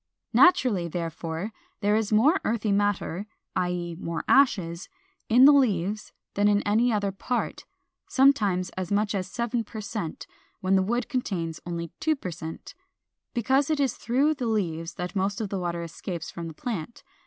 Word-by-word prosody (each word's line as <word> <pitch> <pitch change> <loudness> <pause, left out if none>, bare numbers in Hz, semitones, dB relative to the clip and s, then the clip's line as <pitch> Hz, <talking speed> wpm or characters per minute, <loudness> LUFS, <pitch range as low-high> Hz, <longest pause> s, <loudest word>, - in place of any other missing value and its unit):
Naturally, 240 - +5
therefore, 165 +3 -4 0.3
there 205 0 +3
is 220 -1 0
more 270 - +4
earthy 220 -2 0
matter 205 -1 0 0.3
(i. 180 - +1
e. 175 -1 -3
more 165 -2 -3
ashes) 185 -11 +3 0.4
in 245 +4 +7
the 290 - +10
leaves 215 -7 +1 0.2
than 205 +1 +3
in 205 0 +3
any 225 +4 +3
other 205 -2 0
part 240 +5 -3 0.4
(sometimes 210 -10 +3
as 185 0 -5
much 210 +1 +1
as 190 -2 -2
seven 235 +2 -1
per 220 +1 -8
cent, 205 -5 -5 0.3
when 190 +1 +2
the 190 - +4
wood 235 +6 -1
contains 175 - -2
only 170 -1 -4
two 315 -1 +2
per 185 -10 -6
cent); 160 - -8 0.6
because 265 +5 +2
it 310 -2 +1
is 270 -4 +1
through 270 +6 +2
the 260 -5 -3
leaves 165 -7 -1
that 180 +1 -5
most 195 +1 0
of 215 -3 -3
the 195 - -2
water 170 -1 -2
escapes 170 +1 -6
from 170 -1 -6
the 160 - -9
plant. 225 0 -5
205 Hz, 170 wpm, -26 LUFS, 175-235 Hz, 0.6 s, the